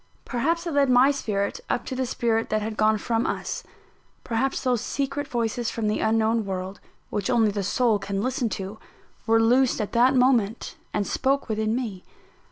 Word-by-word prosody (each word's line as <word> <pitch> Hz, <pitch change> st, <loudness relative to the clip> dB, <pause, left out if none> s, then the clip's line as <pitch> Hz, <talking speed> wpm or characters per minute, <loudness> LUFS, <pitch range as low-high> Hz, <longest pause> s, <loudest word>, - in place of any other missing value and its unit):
Perhaps 330 Hz, +8 st, -1 dB
it 335 Hz, -, -3 dB
led 280 Hz, -2 st, +3 dB
my 255 Hz, +3 st, +6 dB
spirit 210 Hz, -, -2 dB
up -, -, -1 dB
to 260 Hz, -, -4 dB
the 260 Hz, 0 st, -1 dB
spirit 225 Hz, -1 st, 0 dB
that 215 Hz, 0 st, 0 dB
had 220 Hz, 0 st, -4 dB
gone 215 Hz, 0 st, +3 dB
from 225 Hz, +2 st, -1 dB
us -, -, -3 dB, 0.6 s
perhaps 255 Hz, +4 st, -1 dB
those 250 Hz, -4 st, +1 dB
secret 280 Hz, +1 st, -2 dB
voices 235 Hz, -1 st, -1 dB
from 225 Hz, -2 st, -2 dB
the 210 Hz, -, 0 dB
unknown 225 Hz, +1 st, +2 dB
world, 190 Hz, 0 st, -5 dB, 0.3 s
which 200 Hz, -2 st, -2 dB
only 225 Hz, -4 st, +3 dB
the 200 Hz, 0 st, -2 dB
soul 220 Hz, +2 st, +2 dB
can 195 Hz, 0 st, -3 dB
listen 250 Hz, +1 st, -1 dB
to, 200 Hz, +2 st, -5 dB, 0.5 s
were 225 Hz, 0 st, +4 dB
loosed 245 Hz, +3 st, +3 dB
at 210 Hz, -, -2 dB
that 250 Hz, +3 st, +4 dB
moment, 245 Hz, -4 st, +2 dB, 0.2 s
and 205 Hz, -, -1 dB
spoke 275 Hz, +5 st, 0 dB
within 220 Hz, 0 st, 0 dB
me. 220 Hz, -8 st, -4 dB
225 Hz, 180 wpm, -25 LUFS, 215-255 Hz, 0.6 s, my